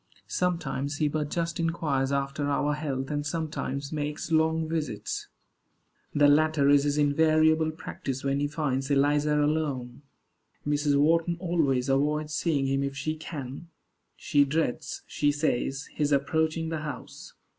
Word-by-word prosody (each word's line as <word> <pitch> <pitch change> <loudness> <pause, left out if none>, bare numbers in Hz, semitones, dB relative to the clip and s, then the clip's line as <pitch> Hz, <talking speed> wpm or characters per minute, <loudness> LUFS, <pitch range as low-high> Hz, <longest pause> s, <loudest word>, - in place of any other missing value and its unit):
Sometimes 160 -6 -1
he 150 - +2
but 150 0 -2
just 170 +1 -2
inquires 155 -5 0
after 140 +1 -1
our 145 +1 +1
health, 140 -2 -3
and 145 0 -1
sometimes 145 -3 -3
makes 150 +1 -3
long 160 0 +2
visits. 150 -10 -3 0.9
The 145 0 +6
latter 150 -1 +4
is 145 0 +5
his 145 0 +1
invariable 155 +2 +3
practice 135 -4 -5
when 140 0 0
he 145 - +1
finds 140 -3 -2
Eliza 145 +1 +3
alone. 145 -5 -1 0.7
Mrs. 145 -1 +2
Wharton 165 +3 +3
always 155 -8 +1
avoids 150 +3 +1
seeing 145 -2 +1
him 135 0 +1
if 140 0 -3
she 155 +4 -2
can. 150 -1 -7 0.5
She 145 -1 +3
dreads, 140 -2 -2
she 145 -1 +1
says, 145 -2 -1
his 150 -1 0
approaching 160 +3 +1
the 160 -1 -2
house. 150 -4 -8
145 Hz, 140 wpm, -27 LUFS, 140-155 Hz, 0.9 s, The